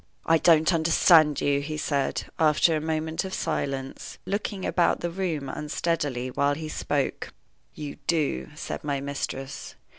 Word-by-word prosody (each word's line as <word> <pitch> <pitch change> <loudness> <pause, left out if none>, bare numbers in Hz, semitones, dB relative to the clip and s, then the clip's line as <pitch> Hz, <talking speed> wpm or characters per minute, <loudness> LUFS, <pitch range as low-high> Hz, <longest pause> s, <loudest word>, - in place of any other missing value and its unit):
"I 165 0 +4
don't 160 +1 +5
understand 160 -2 +5
you," 140 0 +2
he 155 +2 -4
said, 140 -3 -1 0.2
after 160 +1 +4
a 155 - -1
moment 160 0 -2
of 190 0 -4
silence, 135 -4 -3
looking 200 0 -3
about 175 - +2
the 175 - -2
room 165 -6 -2
unsteadily 145 -4 -2
while 140 +2 +1
he 155 +1 -6
spoke. - - -2 0.4
"You 150 -2 -6
do," 145 - 0
said - - -5
my 140 -2 -1
mistress. 140 -1 -5
155 Hz, 145 wpm, -26 LUFS, 140-165 Hz, 0.4 s, don't